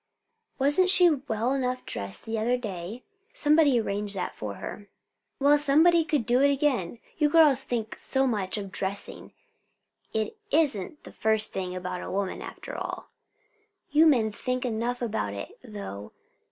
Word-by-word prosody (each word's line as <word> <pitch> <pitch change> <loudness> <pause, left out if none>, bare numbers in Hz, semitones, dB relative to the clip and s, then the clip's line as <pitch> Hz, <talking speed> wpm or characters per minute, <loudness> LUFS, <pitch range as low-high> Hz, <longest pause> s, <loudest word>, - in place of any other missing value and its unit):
"Wasn't 290 +7 +3
she 365 -2 +7
well 255 -4 -1
enough 255 -2 -2
dressed 100 -1 -4
the 225 0 -3
other 240 +3 +1
day?" 210 0 -7 0.3
"Somebody 295 -4 +4
arranged 205 -1 -2
that 185 - -3
for 105 -2 -6
her." 205 - -8 0.5
"Well, 290 +1 +4
somebody 320 +4 +4
could 300 -7 0
do 245 +3 +2
it 280 0 +5
again. 260 - 0 0.2
You 300 -1 +3
girls 300 -4 +6
think 225 -3 -2
so 265 0 +3
much 210 -6 -1
of 200 -2 -6
dressing. 195 +1 -1 0.8
It 220 - -3
isn't 295 - 0
the - - -11
first 220 0 +1
thing 185 -1 -4
about 180 0 -5
a - - -7
woman, 195 0 -3
after - - -8
all." - - -6 0.8
"You 310 +3 +5
men 235 -8 +3
think 255 +4 -3
enough 245 +1 -2
about 105 - -2
it, 100 - -8
though. 200 - -8
235 Hz, 155 wpm, -27 LUFS, 200-280 Hz, 0.8 s, she